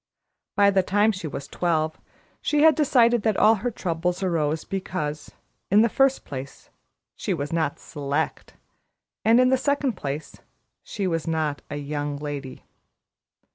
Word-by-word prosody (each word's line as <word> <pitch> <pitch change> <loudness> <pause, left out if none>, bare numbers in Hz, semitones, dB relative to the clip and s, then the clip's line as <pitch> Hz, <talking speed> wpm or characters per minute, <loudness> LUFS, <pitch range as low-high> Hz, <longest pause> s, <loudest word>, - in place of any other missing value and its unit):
By 200 0 +5
the 195 -1 +3
time 205 +4 +2
she 185 -5 -5
was 140 -1 -6
twelve, 160 -3 -1 0.4
she 300 0 +2
had 320 0 +8
decided 240 -6 +3
that 215 -2 +1
all 220 - +6
her 245 - 0
trouble 175 -4 -2
arose 160 -4 0
because, 155 -6 -4 0.4
in 210 +3 +6
the 230 - +3
first 270 0 +2
place, 135 -1 -8 0.4
she 190 - -2
was 145 0 -4
not 160 -4 0
"Select," 145 +2 -3 0.7
and 225 +2 +5
in 255 0 +5
the 260 - +4
second 280 -3 0 0.9
she 200 - -4
was 165 -2 -1
not 155 -3 -1
a 145 - -4
"Young 145 0 -3
Lady." 145 -2 -6
175 Hz, 145 wpm, -24 LUFS, 150-220 Hz, 0.9 s, had